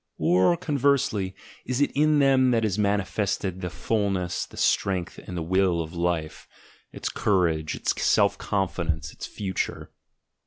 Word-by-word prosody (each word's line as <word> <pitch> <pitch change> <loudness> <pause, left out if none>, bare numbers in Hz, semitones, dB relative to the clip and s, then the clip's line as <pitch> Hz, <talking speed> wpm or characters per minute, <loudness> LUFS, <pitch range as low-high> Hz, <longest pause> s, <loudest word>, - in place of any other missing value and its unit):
Or, 95 - +3
conversely, 140 - 0 0.3
is 125 0 -2
it 145 - +2
in 150 +1 +3
them 135 -2 +4
that 115 -2 +2
is 105 -1 -1
manifested 100 -2 -1
the 90 - -3
fulness, 95 -2 -1
the - - -15
strength, 95 -3 0
and 90 - -8
the 85 - -2
will 95 0 +2
of 80 0 -4
Life, 85 -2 -2 0.4
its - - -5
courage, 85 -6 +1
its - - -1
self - - +3
confidence, 85 -6 -2
its - - -7
future? 95 -3 -4
95 Hz, 145 wpm, -25 LUFS, 90-115 Hz, 0.4 s, them